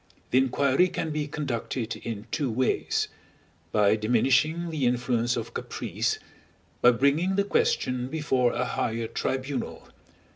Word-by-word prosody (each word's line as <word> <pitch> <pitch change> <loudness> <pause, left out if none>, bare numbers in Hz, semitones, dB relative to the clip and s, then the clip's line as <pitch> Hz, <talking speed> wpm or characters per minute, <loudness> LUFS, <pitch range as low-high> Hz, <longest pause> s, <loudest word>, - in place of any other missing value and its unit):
The 130 - +5
inquiry 135 +5 +3
can 160 -3 -3
be 150 -1 -2
conducted 125 -5 -3
in 110 -2 -6
two 150 -4 0
ways: 125 +3 0 0.6
by 105 0 +4
diminishing 130 +9 +2
the 145 -6 +1
influence 120 0 +1
of 115 - -5
caprice; - - -2 0.6
by 120 - +8
bringing 140 +10 +2
the 200 - +3
question 200 - +1
before 130 -5 +1
a 125 - -1
higher 115 -2 -1
tribunal. 130 +4 -3
130 Hz, 125 wpm, -27 LUFS, 120-150 Hz, 0.6 s, by